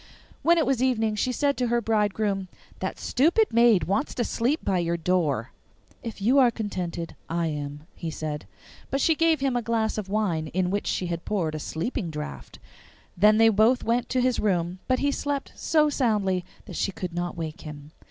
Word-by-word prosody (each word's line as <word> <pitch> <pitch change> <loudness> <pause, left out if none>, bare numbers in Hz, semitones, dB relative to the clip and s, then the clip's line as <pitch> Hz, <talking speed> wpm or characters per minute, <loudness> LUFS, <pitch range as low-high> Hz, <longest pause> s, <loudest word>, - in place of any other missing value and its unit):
When 340 +1 +4
it 320 - +3
was 265 -3 +1
evening 225 -4 +2
she 250 +4 0
said 280 +3 +1
to 250 - 0
her 240 0 +2
bridegroom, 210 -3 0 0.3
'That - - -3
stupid 340 - +2
maid 230 -4 +5
wants 200 +9 -1
to 240 - 0
sleep 250 +7 -1
by 190 -2 +2
your 170 0 0
door.' 160 -9 0 0.5
'If 230 -3 -6
you 245 +8 +4
are 255 -2 +6
contented, 185 -7 -4
I 170 +1 0
am,' 145 0 -5
he 165 - -5
said. 155 -1 -5 0.4
But 275 - 0
she 320 - +4
gave 325 -1 +2
him 270 -2 +1
a 245 - +1
glass 220 -1 0
of 195 -3 -6
wine 190 -7 0
in 180 +3 -1
which 205 +1 -1
she 185 - -1
had 170 -1 -3
poured 170 -7 -1
a 155 - -3
sleeping 175 - -3
draught. 150 -1 -7 0.6
Then 210 +4 +5
they 225 0 +6
both 220 +4 +3
went 235 +2 0
to 255 - +1
his 250 -1 +1
room, 180 -3 0
but 255 - +2
he 285 +1 +1
slept 285 -1 -3
so 305 -2 +2
soundly 210 -10 +1 0.2
that - - -9
she 195 - 0
could 180 -2 -5
not 175 0 -3
wake 160 -2 -5
him. 150 -1 -9
210 Hz, 200 wpm, -26 LUFS, 170-250 Hz, 0.6 s, are